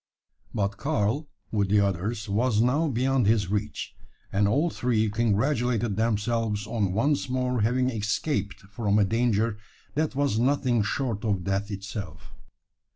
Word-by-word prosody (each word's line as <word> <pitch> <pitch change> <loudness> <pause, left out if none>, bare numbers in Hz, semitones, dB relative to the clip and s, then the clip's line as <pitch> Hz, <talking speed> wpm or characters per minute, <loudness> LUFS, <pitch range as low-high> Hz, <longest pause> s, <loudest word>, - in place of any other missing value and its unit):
But 100 -1 -1
Karl, 140 +2 -1 0.2
with 100 -3 +1
the 105 +1 +4
others, 100 +3 -1
was 110 +2 +1
now 135 +8 +3
beyond 130 -2 +1
his 105 -4 +2
reach; 105 0 -3 0.4
and 100 +1 +3
all 145 +11 +2
three 110 -4 +1
congratulated 115 0 +1
themselves 110 -1 0
on 105 -3 -1
once 140 +5 +1
more 125 -2 0
having 125 +4 +2
escaped 105 -1 -2
from 100 +1 -1
a 105 - +4
danger 115 0 +1 0.3
that 150 -2 -1
was 140 -6 +1
nothing 125 -2 +2
short 110 0 -2
of 100 -5 0
death 100 +3 -1
itself. 100 0 -7
110 Hz, 140 wpm, -26 LUFS, 100-125 Hz, 0.4 s, the